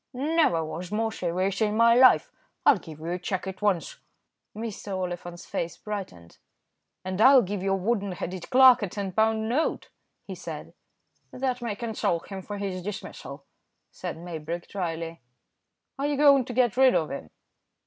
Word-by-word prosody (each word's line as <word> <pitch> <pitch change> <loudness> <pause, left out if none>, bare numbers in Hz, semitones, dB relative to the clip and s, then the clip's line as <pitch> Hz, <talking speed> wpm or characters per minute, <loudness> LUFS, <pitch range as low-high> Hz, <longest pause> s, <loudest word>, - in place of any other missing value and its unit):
"Never 275 - +2
was 170 +4 -6
more 225 +1 0
serious 185 0 -2
in 215 0 +1
my 230 0 +6
life. 255 +2 +6 0.3
I'll - - +6
give 160 -3 -11
you 165 +2 -4
a 180 - -2
cheque 185 +1 -3
at 190 0 -7
once." 200 -5 0 0.6
Mr. 210 -3 -5
Oliphant's 175 -1 -5
face 170 - -4
brightened. 190 - -7 0.7
"And 185 +2 -2
I'll 265 +1 +8
give 200 0 -4
your 195 0 +1
wooden 200 0 -1
headed 180 0 -6
clerk 255 -1 +7
a 205 - -1
ten 195 0 -4
pound 220 +2 +1
note," 270 +8 -1 0.3
he - - -6
said. - - -8 0.6
"That 255 -1 -2
may 230 -4 -3
console 220 -6 -1
him 190 +3 -8
for 205 +2 -6
his 195 -2 -4
dismissal," 160 -7 -7 0.5
said - - -6
Maybrick, 170 0 -6
dryly. 165 -4 -4 0.8
"Are 280 - 0
you 290 -1 -1
going 280 -3 +6
to 245 - -6
get 245 -1 +2
rid 265 -1 +6
of 160 - 0
him?" 135 - -6
200 Hz, 165 wpm, -26 LUFS, 175-235 Hz, 0.8 s, I'll